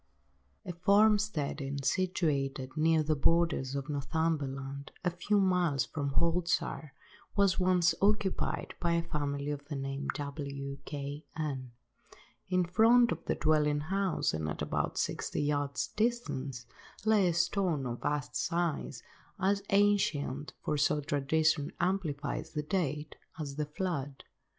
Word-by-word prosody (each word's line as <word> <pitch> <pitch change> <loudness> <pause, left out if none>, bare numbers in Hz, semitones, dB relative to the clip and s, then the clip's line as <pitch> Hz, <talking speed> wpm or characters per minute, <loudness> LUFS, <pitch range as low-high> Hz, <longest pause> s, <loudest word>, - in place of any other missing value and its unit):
A 180 - -4
farm–steading 175 -8 +2
situated 140 -8 0
near 160 0 +3
the 155 +1 +1
borders 150 -3 +2
of 140 0 -3
Northumberland, 140 -2 -2
a 180 - +2
few 200 +4 +1
miles 175 -9 +2
from 140 -1 -3
Haltwhistle, 170 -2 +1 0.5
was 200 -2 +3
once 180 -2 +4
occupied 200 -1 +1
by 170 -1 +1
a 170 0 +1
family 145 -3 -2
of 145 -1 -5
the 145 - -4
name 135 +1 -3
of - - -1
W—— 140 -1 -5
K—— 145 +1 -5
n. 135 -6 -3 0.8
In 185 -1 +2
front 225 +6 +5
of - - -3
the - - 0
dwelling–house, 155 +5 +1
and 80 0 -2
at - - -3
about - - -1
sixty - - -1
yards' 145 -2 -1
distance, 145 - -2 0.4
lay 215 -4 +4
a 175 - +2
stone 170 -4 +1
of 120 -1 -4
vast 145 0 -2
size, 170 -7 -1 0.4
as 200 +2 +2
ancient, 195 -9 +2
for 150 - 0
so 150 +1 +2
tradition 145 +1 +1
amplifies 160 -6 -1
the 150 -1 -2
date, 150 -3 -2 0.2
as 145 -3 -5
the 150 0 -2
flood. 145 -5 -3
150 Hz, 130 wpm, -31 LUFS, 140-180 Hz, 0.8 s, front